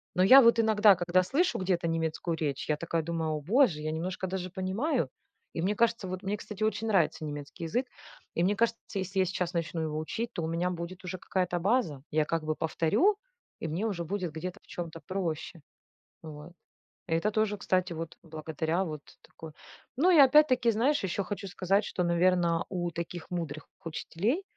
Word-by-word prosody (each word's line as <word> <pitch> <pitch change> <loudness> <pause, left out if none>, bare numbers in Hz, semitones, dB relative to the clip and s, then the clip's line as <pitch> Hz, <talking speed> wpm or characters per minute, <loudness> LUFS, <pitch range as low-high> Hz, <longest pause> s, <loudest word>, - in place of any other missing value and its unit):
но 180 - +2
я 255 +8 +10
вот 235 -1 +5
иногда, 215 -2 +6
когда 180 +1 +2
слышу 290 - +1
где-то 180 -2 0
немецкую 165 0 -1
речь, 145 -3 -3
я 150 - +3
такая 165 +1 -1
думаю: 160 -1 -2
"О 155 -1 -2
боже, 190 - +3
я 155 +1 -2
немножко 180 +4 -3
даже 185 -1 -4
понимаю." 190 - -1 0.4
И 165 - -3
мне 200 +3 +1
кажется, 230 -2 +1
вот, 185 +2 -5
мне, 200 +2 -1
кстати, 210 0 -9
очень 220 +1 0
нравится 170 -6 +2
немецкий 145 +2 -7
язык 245 +11 -1 0.5
и, 170 - +1
мне 200 +3 +2
кажется, 230 +2 +1 0.2
если 190 +1 -2
я 190 - +4
сейчас 180 -1 -2
начну 165 -1 -2
его 155 -1 -2
учить, 225 +9 -3
то 170 - -3
у - - -1
меня 170 +2 0
будет 175 +1 -6
уже 185 +1 -4
какая-то 180 -1 -1
база. 180 - 0
Я 155 0 +2
как 165 +1 -1
бы 155 0 -1
повторю 165 - +2 0.5
и - - -1
мне 170 +7 -2
уже 185 -5 -2
будет 185 -1 -3
где-то 180 +3 -5
в - - -27
чём-то 165 -2 -6
проще, 170 -3 -3 0.6
вот. 155 +1 -10 0.6
Это 165 +5 +1
тоже, 215 -1 +1
кстати, 185 -3 0
вот 165 0 -6
благодаря 160 +2 -2
вот 155 -4 -5 0.2
такой 160 -1 -12 0.4
Ну 335 +8 +4
и 345 - +6
опять-таки, 255 -3 +5
знаешь, 265 +7 +2
еще 190 +1 -1
хочу 200 0 -5
сказать, 195 +3 +1
что, 180 - -2
наверное, 170 -1 +2
у 175 -2 -2
таких 170 0 -6
мудрых 160 -4 -4 0.2
учителей, 195 - -2
180 Hz, 190 wpm, -29 LUFS, 165-205 Hz, 0.6 s, я